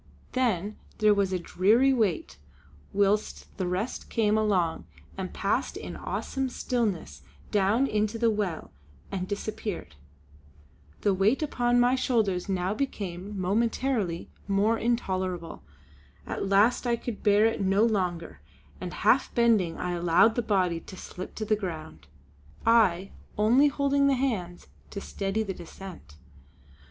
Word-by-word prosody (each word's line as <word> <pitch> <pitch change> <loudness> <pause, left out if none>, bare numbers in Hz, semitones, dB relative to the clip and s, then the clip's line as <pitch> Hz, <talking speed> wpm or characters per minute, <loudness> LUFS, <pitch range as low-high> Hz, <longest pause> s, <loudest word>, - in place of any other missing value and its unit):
Then 215 -6 0 0.2
there 215 -1 +5
was 200 -2 +1
a 185 - +1
dreary 215 +10 +3
wait 170 - -1 0.5
whilst 205 +1 0
the 185 - -1
rest 185 +7 -3
came 215 -2 +2
along 190 -7 +1 0.3
and 190 -1 -5
passed 210 +7 -1
in - - -7
awesome 265 -1 -3
stillness 205 - -2 0.3
down 205 +6 +3
into 215 -2 0
the 230 0 +3
well 200 -6 -3 0.4
and 185 -1 -3
disappeared. 205 - -4 1.1
The 200 - +2
weight 210 +10 +2
upon 245 -4 +1
my 245 +1 +4
shoulders 220 -8 0
now 185 0 0
became 200 -5 -4
momentarily 215 -1 0 0.2
more 210 +3 +2
intolerable. 185 -7 -2 0.6
At 195 - -3
last 210 +6 +3
I 235 - +3
could 235 -2 -6
bear 210 0 +4
it 225 - +1
no 195 +2 +3
longer, 180 -7 -1 0.4
and - - -6
half - - +4
bending 225 -8 +3
I 180 - -2
allowed 175 +5 +4
the 240 - 0
body 185 -6 +1
to 185 - -12
slip 185 +1 -8
to 215 - -3
the 215 - +2
ground, 160 - -7 0.6
I 195 -5 +3 0.3
only 240 +7 +5
holding 280 0 +2
the 275 - +3
hands 205 -10 -2 0.2
to 200 - -6
steady 200 +2 -2
the 195 -3 -4
descent. 175 - -11
205 Hz, 135 wpm, -27 LUFS, 185-230 Hz, 1.1 s, there